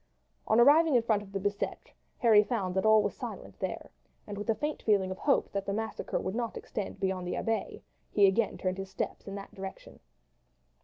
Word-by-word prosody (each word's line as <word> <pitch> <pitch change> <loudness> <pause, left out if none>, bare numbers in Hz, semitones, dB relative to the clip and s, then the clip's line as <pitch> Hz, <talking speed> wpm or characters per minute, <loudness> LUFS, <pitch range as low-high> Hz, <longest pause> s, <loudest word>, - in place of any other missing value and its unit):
On 220 - +4
arriving 295 +4 +6
in 240 - +4
front 215 -3 +2
of 200 -1 -12
the 195 - -2
Bicetre 200 +1 -3 0.2
Harry 220 -3 +6
found 200 -6 -2
all 215 +2 +5
was - - -2
silent - - -8
there, - - -4 0.3
and 205 - -6
with 205 +2 -6
a 225 - +3
faint 300 +4 -3
feeling 195 -3 +2
of 185 - -6
hope 280 - +2
that 200 -1 -2
the 200 - 0
massacre 220 +1 -3
would 190 - -3
not 235 0 -3
extend 205 - -5
beyond 190 -2 -1
the - - -2
Abbaye, 225 -1 -2 0.3
he 205 - +5
again 195 +3 +2
turned 185 0 -2
his 195 0 -5
steps 190 - -4
in 195 - -5
that 200 0 -8
direction. 190 0 -9
205 Hz, 205 wpm, -30 LUFS, 195-225 Hz, 0.3 s, arriving